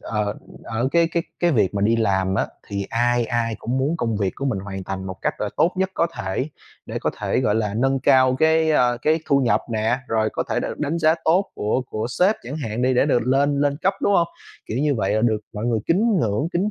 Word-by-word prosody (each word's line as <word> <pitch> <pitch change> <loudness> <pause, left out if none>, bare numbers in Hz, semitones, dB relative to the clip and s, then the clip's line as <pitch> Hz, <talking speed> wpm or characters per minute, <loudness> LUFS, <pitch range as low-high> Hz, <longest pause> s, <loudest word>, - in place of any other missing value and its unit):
ờ, 105 -1 -2 0.3
ở 115 +3 -1
cái 170 -1 +4
cái 170 - +1 0.2
cái 175 - +3
việc 105 -6 +2
mà 100 - -1
đi 115 +3 +3
làm 95 -4 +1
á - - +1 0.2
thì 100 -1 -3
ai 120 +1 +2
ai 115 -1 -1
cũng 125 +3 -2
muốn 145 +6 0
công 115 -7 -1
việc 100 -2 -1
của 135 - -4
mình 130 -8 0
hoàn 95 -1 -6
thành 95 0 -5
một 95 - -5
cách - - -2
là - - -1
tốt 175 - +3
nhất 190 0 0
có 170 - +2
thể, 95 +10 -3 0.4
để - - -4
có - - -1
thể, - - 0
gọi 105 -5 +1
là, 105 -2 -1
nâng 135 +3 +1
cao 130 0 +4
cái, 160 +1 +3
ơ, 120 -5 +3
cái, 160 +1 +2
thu 140 - +3
nhập 125 -4 +2
nè, 110 +3 +1
rồi 110 -1 +1
có - - -1
thể - - +1
đ - - -3
đánh 150 +3 -1
giá 160 0 +4
tốt 185 +5 +2
của 110 +5 -1
của 110 -2 -3
sếp 195 +4 +4
chẳng 135 +6 -6
hạn 115 -5 -3
đi 130 +1 +2
để 125 - +3
được 125 - +2
lên 140 +2 +2
lên 145 -1 +1
cấp, 195 +1 +2
đúng 205 - +3
hông? 170 -3 +3 0.4
Kiểu, 110 - -3
như 145 0 +2
vậy 100 -4 0
là 110 - +2
được 110 -2 +1
mọi 105 +1 -5
người 115 -2 +1
kính 205 +5 +2
ngưỡng, 110 +7 0
kính 190 +5 0
125 Hz, 255 wpm, -22 LUFS, 110-155 Hz, 0.4 s, cái